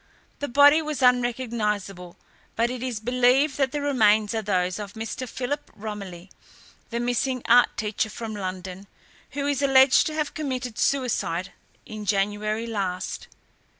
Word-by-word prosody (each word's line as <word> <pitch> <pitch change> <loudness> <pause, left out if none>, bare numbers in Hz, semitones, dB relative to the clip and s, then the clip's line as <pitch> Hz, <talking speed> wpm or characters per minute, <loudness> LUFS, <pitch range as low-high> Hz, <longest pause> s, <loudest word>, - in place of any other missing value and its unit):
The 285 - -3
body 285 +4 +6
was 305 -3 -3
unrecognisable 225 -7 0 0.4
but 235 +1 +1
it 250 -1 -5
is 250 -4 -3
believed 250 +5 +2
that 270 -2 +2
the 295 - -3
remains 220 -6 +3
are 225 - -1
those 185 -2 -1
of 205 -1 -7
Mr. 225 +3 -5
Philip 285 +5 -4
Romilly, 200 -4 -8 0.6
the 235 - -3
missing 245 +1 -1
art 245 +1 +4
teacher 215 0 -1
from 220 +1 -6
London, 190 -1 -6 0.5
who 280 0 -2
is 285 -1 0
alleged 265 -1 +5
to 310 - -4
have 305 -2 -2
committed 255 -6 -4
suicide 230 -9 0 0.3
in 215 -1 -8
January 210 +2 0
last. 195 -4 -4
230 Hz, 145 wpm, -25 LUFS, 205-260 Hz, 0.6 s, body